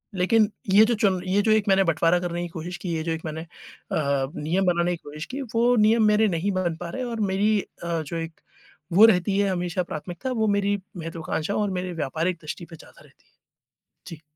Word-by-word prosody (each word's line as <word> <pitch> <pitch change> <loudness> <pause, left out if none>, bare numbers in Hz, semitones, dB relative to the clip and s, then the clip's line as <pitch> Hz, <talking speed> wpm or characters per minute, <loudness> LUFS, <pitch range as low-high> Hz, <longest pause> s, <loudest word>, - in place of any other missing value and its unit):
लेकिन 210 +4 +3 0.2
ये 210 +2 +8
जो 235 - +1
चन 200 -5 +1
ये 195 +2 +2
जो 220 - +2
एक 215 -1 +3
मैंने 195 0 +5
बँटवारा 170 0 +2
करने 175 -1 -3
की - - -3
कोशिश 170 +2 -6
की 180 -1 -6
है, - - -1
ये 160 - -3
जो 165 - -2
एक 160 0 -3
मैंने 160 0 -4
अ, 140 -4 -3
नियम 175 +6 0
बनाने 175 -1 +2
की 170 - -16
कोशिश 150 +1 -7
की, 275 +2 -6
वो 240 0 +2
नियम 220 +1 +4
मेरे 210 +1 +4
नहीं 185 +1 -1
बन 185 -3 -1
पा 175 - -4
रहे 255 +9 -4
और 235 -2 -4
मेरी 210 +2 +2 0.2
अ, 170 -1 -1
जो 155 +2 -5
एक 165 0 -6 0.5
वो 210 +5 +8
रहती 195 -2 +3
है 200 -1 +2
हमेशा 180 0 -1
प्राथमिकता, 175 - -6
वो 220 -3 0
मेरी 200 0 +1 0.2
महत्वाकांक्षा 165 +1 -3
और 210 -1 0
मेरी 180 -1 -4
व्यापारिक 165 +3 -2
दृष्टि 155 +3 -7
पे 165 - -12
ज़्यादा - - -17
रहती - - -25
है। - - -34 0.8
जी। 160 -2 -9
180 Hz, 220 wpm, -24 LUFS, 165-205 Hz, 0.8 s, ये